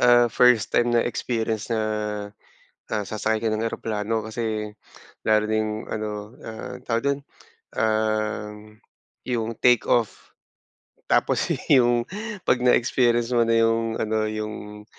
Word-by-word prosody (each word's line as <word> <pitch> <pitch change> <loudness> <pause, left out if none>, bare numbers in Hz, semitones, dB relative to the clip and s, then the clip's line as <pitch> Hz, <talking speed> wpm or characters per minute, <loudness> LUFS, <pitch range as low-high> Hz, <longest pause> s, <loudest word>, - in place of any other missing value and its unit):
ah, 120 0 +6
first 125 -4 +4
time 120 0 +3
na - - +3
experience 110 -1 -2
na, 115 -2 0 1.1
ah, 105 -1 0
sasakay 110 0 -1
ka 115 - 0
ng 110 +1 -1
eroplano. 110 0 -2
Kasi 110 -2 -3 0.5
lalo 110 0 +3
na 110 - +1
yung 110 0 0 0.2
ano, 110 -1 -3 0.3
ah, 110 +3 -7
tawag 115 -1 0
do'n, 140 0 -2 0.6
uhm, 110 -1 -1 0.5
yung 115 -2 -1
take 125 -2 +4
off, 115 -3 0 0.8
tapos - - +2 0.2
yung 120 -2 +5 0.4
'pag 125 - +4
na 125 - +6
experience 120 -1 +2
mo 120 -1 +4
na 115 - +3
yung 115 0 0
ano, 110 0 0
yung, 105 -1 -6
110 Hz, 130 wpm, -24 LUFS, 110-120 Hz, 1.1 s, ah